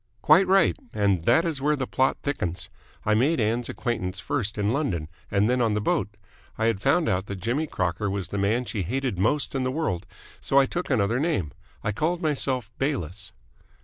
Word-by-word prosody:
"Quite 175 +5 +6
right. 195 +1 +4 0.2
And 100 -5 +1
that 160 +8 +4
is 155 -5 -1
where 150 +2 +2
the 135 -2 -2
plot 130 +1 +1
thickens. 90 - -3 0.3
I 105 - +3
made 135 +9 +2
Ann's 115 +2 0
acquaintance 100 -7 -2
first 115 -6 -2
in 105 +2 +1
London 90 - -1 0.2
and 100 +1 +2
then 125 +1 +2
on 110 -3 +2
the - - +1
boat. 105 0 -1 0.4
I 110 - 0
had 115 -4 +1
found 155 +7 +3
out 95 +1 0
that 100 - -4
Jimmy 120 - -1
Crocker 90 - -1
was 95 -2 -3
the 100 - -3
man 110 +6 +1
she 110 -4 -3
hated 125 +1 -2
most 140 +9 +1
in 135 - -1
the 130 - 0
world, 130 - -2 0.3
so 135 - +1
I 140 - +7
took 175 +6 -4
another 115 -2 +2
name. 145 - 0 0.3
I 105 - 0
called 160 - 0
myself 135 - 0
Bayliss." 105 - -2
115 Hz, 200 wpm, -26 LUFS, 100-140 Hz, 0.4 s, I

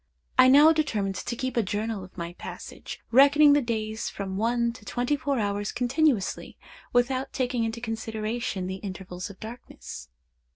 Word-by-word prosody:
I 255 - +9
now 295 +5 +8
determined 220 -11 0
to 235 +5 -4
keep 260 +1 -3
a 235 - +3
journal 210 0 -3
of 185 - -14
my 170 0 -5
passage, - - -8
reckoning 285 +3 +7
the 290 - +4
days 220 -2 -3
from 195 -1 -5
one 235 +3 +1
to 235 - -14
twenty 245 +6 0
four 280 -1 -1
hours 205 -1 -1
continuously, 250 - 0 0.3
without 255 +2 +1
taking 250 -2 0
into 225 +1 -3
consideration 225 -2 -3
the 190 +1 -4
intervals 190 -1 -7
of 200 - -12
darkness. 220 - -9
230 Hz, 160 wpm, -27 LUFS, 205-255 Hz, 0.3 s, I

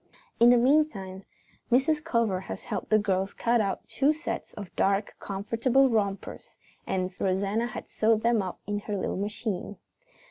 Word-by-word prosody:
In 235 +1 +7
the 245 - +7
meantime, 235 -8 +1 0.5
Mrs. 295 +5 +3
Culver 230 - +1
had 190 - -6
helped - - -5
the 215 - +5
girls 195 -2 0
cut 235 0 +2
out 195 -2 -3
two 280 +3 +2
sets 310 +2 -5
of 200 -3 -9
dark, 200 +1 +1
comfortable 230 +7 +1
rompers, 200 -3 -2 0.3
and 185 0 -2
Rosanna 200 +5 0
had 230 - -7
sewed 220 0 +1
them 235 -2 +3
up 185 -2 -5
on 205 0 -1
her 205 0 -4
little - - -2
machine. 205 -1 -3
210 Hz, 155 wpm, -27 LUFS, 195-240 Hz, 0.5 s, In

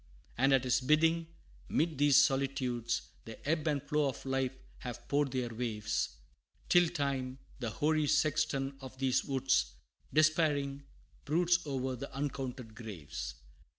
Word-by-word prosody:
And 135 +3 +3
at 135 -1 +4
his 125 0 +2
bidding, 160 +4 +3 0.4
'mid 155 -2 0
these 145 -2 +6
solitudes, 130 -4 -1 0.2
The 115 +5 -10
ebb 160 0 +1
and 145 -3 +1
flow 150 -1 +1
of 135 - -8
life 135 -1 -1 0.2
have 125 -2 -7
poured 145 0 +2
their 125 -2 -2
waves, 110 -3 -2 0.5
Till 175 -1 +6
Time, 135 -5 -2 0.2
the 120 -3 -2
hoary 155 +5 +1
sexton 140 -2 +1
of 130 0 -9
these 130 -1 +2
woods, 135 -1 +1 0.4
Despairing, 150 -3 +2 0.4
broods 175 +4 +3
o'er 130 -2 -2
the 135 +3 -7
uncounted 130 -4 -4
graves. 105 -10 -6
135 Hz, 135 wpm, -33 LUFS, 125-150 Hz, 0.5 s, these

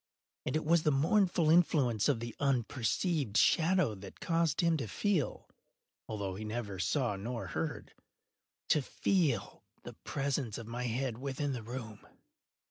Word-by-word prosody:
And - - -1
it 155 - 0
was 170 +1 +4
the 155 - +2
mournful 165 +2 +3
influence 140 - +3
of 135 -5 +2
the 120 0 -6
unperceived 135 - 0
shadow 170 - +4
that 95 -1 -11
caused 165 -3 +1
him 170 -1 +3
to 135 - -3
feel—although 110 - -4
he 100 +4 -6
neither 105 -3 -4
saw 120 +1 +1
nor 115 +4 -4
heard—to 150 0 -4
feel 135 - 0 0.2
the - - -8
presence 135 -5 -2
of 115 - -7
my 120 +2 -4
head 120 0 -2
within 140 +1 -2
the 125 - -4
room. 115 -2 -7
130 Hz, 135 wpm, -32 LUFS, 115-155 Hz, 0.2 s, was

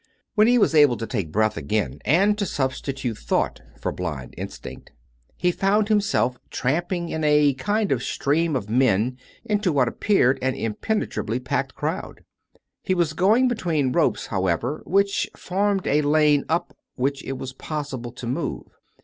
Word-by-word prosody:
II - - -39 0.3
When 215 -1 +5
he 245 +1 +5
was 210 - +3
able 145 -6 +5
to 115 - -4
take 100 -10 -3
breath 110 +2 +1
again, 100 +8 -2
and 195 +8 +3
to 200 - +1
substitute 130 -4 -3
thought - - -1 0.2
for - - -2
blind 75 -8 -5
instinct, - - -8 0.5
he 180 - +2
found 205 +4 +1
himself 200 - +1
tramping 170 +6 -1
in 160 - -3
a 150 -1 +4
kind 205 +9 -1
of 130 -3 +1
stream 150 +4 0
of 115 -6 -2
men 120 +1 +2 0.3
into 205 -4 +1
what 135 -4 +2
appeared 135 - +2
an 130 0 0
impene 160 - -1
trably 115 +4 -3
packed 135 0 -1
crowd. 155 +5 -4 0.6
He 185 - 0
was 170 -3 +1
going 215 +10 +4
between 165 - 0
ropes, 165 +4 +1
how 95 -3 -1
ever, 120 - -1
which 200 +2 +1
formed 195 +1 0
a 150 +2 +3
lane 150 -1 +3
up 165 +2 -1 0.2
which 135 +2 -1
it 135 - -4
was 130 0 -6
possible 135 -4 -5
to 120 - -9
move. 120 +3 -3
145 Hz, 165 wpm, -23 LUFS, 125-185 Hz, 0.6 s, When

